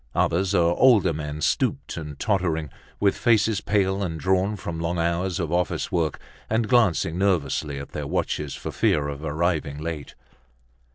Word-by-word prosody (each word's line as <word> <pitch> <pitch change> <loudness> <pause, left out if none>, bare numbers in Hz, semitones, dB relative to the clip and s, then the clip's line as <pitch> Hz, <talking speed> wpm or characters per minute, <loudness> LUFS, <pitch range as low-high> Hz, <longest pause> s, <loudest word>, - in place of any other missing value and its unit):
Others 95 +3 +1
are 85 -1 +4
older 110 -10 +5
men, 75 0 -5
stooped - - 0
and 75 -3 -7
tottering, 85 -7 0 0.3
with 100 -1 +3
faces 110 -3 +2
pale 100 -1 +1
and 80 -4 -3
drawn 95 +5 +1
from 85 -4 -5
long 85 +1 -1
hours 85 +3 0
of 85 -3 -2
office 90 0 -1
work 80 -4 0 0.3
and 110 0 +1
glancing 95 -8 +2
nervously 75 -6 0
at 70 0 -7
their 75 -2 -4
watches 75 0 -2
for - - -6
fear 75 -1 +1
of 70 +1 -6
arriving 80 -2 -1
late. 75 -2 -6
85 Hz, 160 wpm, -24 LUFS, 75-95 Hz, 0.3 s, older